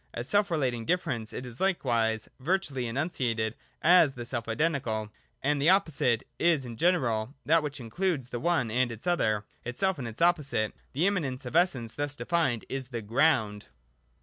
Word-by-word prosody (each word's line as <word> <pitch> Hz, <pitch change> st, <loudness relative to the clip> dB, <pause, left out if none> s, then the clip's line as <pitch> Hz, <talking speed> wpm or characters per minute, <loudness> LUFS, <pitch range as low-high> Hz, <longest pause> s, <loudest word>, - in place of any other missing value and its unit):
As 120 Hz, -, -4 dB
self 205 Hz, 0 st, +2 dB
relating 130 Hz, -8 st, 0 dB
difference 130 Hz, -8 st, -1 dB
it 125 Hz, -, -6 dB
is 125 Hz, 0 st, -9 dB
likewise 115 Hz, -, +1 dB
virtually 140 Hz, -5 st, -1 dB
enunciated 115 Hz, -5 st, -1 dB, 0.3 s
as 165 Hz, -4 st, +6 dB
the 120 Hz, -1 st, -6 dB
self 120 Hz, -1 st, -3 dB
identical. 115 Hz, -6 st, -1 dB, 0.3 s
And 145 Hz, +1 st, +1 dB
the 155 Hz, -, +4 dB
opposite 160 Hz, -, +2 dB, 0.2 s
is 165 Hz, -6 st, +3 dB
in 120 Hz, -1 st, -7 dB
general 125 Hz, -6 st, +1 dB
that 165 Hz, +2 st, +4 dB
which 145 Hz, -2 st, -5 dB
includes 135 Hz, -, -2 dB
the 120 Hz, -, -4 dB
one 160 Hz, -8 st, +1 dB
and 125 Hz, +1 st, +1 dB
its 115 Hz, -1 st, -9 dB
other, 110 Hz, -, +1 dB, 0.2 s
itself 170 Hz, +8 st, -1 dB
and 125 Hz, -, -4 dB
its 115 Hz, 0 st, -8 dB
opposite. 150 Hz, -11 st, +2 dB, 0.2 s
The 150 Hz, +7 st, +1 dB
immanence 145 Hz, -10 st, -1 dB
of 125 Hz, -, -6 dB
essence 130 Hz, -10 st, +2 dB
thus 145 Hz, 0 st, -2 dB
de -, -, -6 dB
fined 160 Hz, -10 st, +1 dB
is 135 Hz, -1 st, -4 dB
the 120 Hz, -3 st, -5 dB
Ground. 110 Hz, -3 st, +1 dB
130 Hz, 175 wpm, -29 LUFS, 115-165 Hz, 0.3 s, as